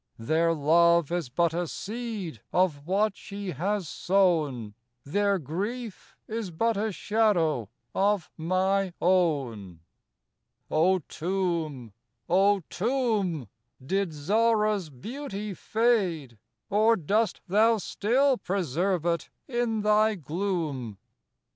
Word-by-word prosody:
Their 160 +8 +1
love 170 +2 +4
is 175 -7 -2
but 165 +5 +1
a 175 +1 -1
seed 210 - -5
of 160 -5 +1
what 200 +2 +1
she 200 -1 -6
has 185 +4 -2
sown; 155 - +1 0.3
Their 200 +6 +1
grief 200 - -5
is 220 -3 -4
but 225 +7 0
a 215 +2 -1
shadow 175 - +1 0.2
of 200 -2 +1
my 185 +3 0
own. 135 - 0 0.9
O 180 +4 +3
Tomb, 165 - -2 0.3
O 195 +2 +3
Tomb! 210 - -1 0.4
did 195 +4 0
Zahra's 210 +3 +1
beauty 210 - -6
fade, 185 - 0 0.3
Or 215 +3 +4
dost 210 +5 0
thou 220 +4 +4
still 250 +6 +1
preserve 180 -1 -1
it 170 -1 -1 0.2
in 240 -4 -1
thy 215 +1 +3
gloom? 155 - -3
185 Hz, 105 wpm, -27 LUFS, 160-210 Hz, 0.9 s, love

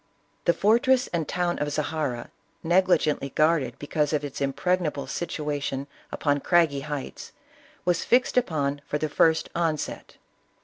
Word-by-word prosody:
The 170 - +5
fortress 245 +6 +3
and 165 -3 -1
town 175 -1 -1
of 145 0 -1
Zahara, 145 -5 -2 0.3
negligently 170 -5 +2
guarded 155 -4 +1
because 150 +1 -1
of 150 -1 0
its 140 0 -7
impregnable 150 +1 0
situation 145 -4 -3 0.3
upon 145 -1 0
craggy 165 -2 +3
heights, 145 -1 -6 0.5
was 175 -1 +1
fixed 250 +1 +2
upon 145 - 0
for 150 - -1
the 155 0 -2
first 160 +2 +3
onset. 165 -3 -2
155 Hz, 130 wpm, -26 LUFS, 145-175 Hz, 0.5 s, The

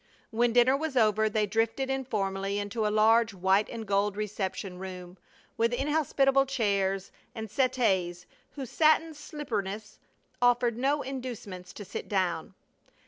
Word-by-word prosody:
When 235 +1 +2
dinner 245 +3 +5
was 295 -2 -2
over 220 -1 +3
they 215 0 +1
drifted 225 +6 0
informally 200 -7 -2
into 205 +2 -1
a - - +1
large 220 0 +4
white 190 +3 +2
and 230 -2 -6
gold 200 0 +1
reception 195 -3 -4
room, 180 -1 -8 0.4
with 230 +1 +2
inhospitable 275 -1 +2
chairs 195 -6 0 0.2
and 220 -3 -6
settees 190 -10 +1 0.3
whose 265 -4 -7
satin 315 +1 +3
slipperiness 220 - -5 0.4
offered 245 -1 +3
no 280 +4 +1
inducements 240 -9 -6
to 205 - -8
sit 195 - -6
down. 185 -2 -1
220 Hz, 135 wpm, -29 LUFS, 195-260 Hz, 0.4 s, dinner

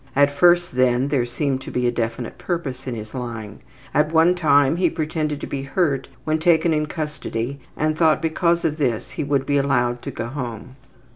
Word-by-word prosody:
At 140 +1 +4
first, 175 +2 +4
then, 130 +1 +2
there 130 -4 +1
seemed 135 +2 -1
to - - -8
be 125 0 -1
a 120 - +3
definite 115 0 -3
purpose 135 -7 -4
in 125 - -2
his 110 -1 -8
lying. 115 -5 -6 0.3
At 150 +1 +2
one 165 +2 +5
time 145 -3 +3
he 185 - +3
pretended 155 -2 -2
to - - -3
be 135 - -4
hurt 140 -1 0 0.2
when 155 0 0
taken 165 0 +3
in 150 0 0
custody 140 -4 -4 0.2
and 155 0 +1
thought 160 -1 +3
because 170 +1 +1
of 155 -1 0
this 125 -7 -1
he - - -3
would 140 -1 0
be 145 +1 +1
allowed 125 -3 +1
to - - -5
go - - -5
home. 125 -1 -6
140 Hz, 200 wpm, -22 LUFS, 125-155 Hz, 0.3 s, one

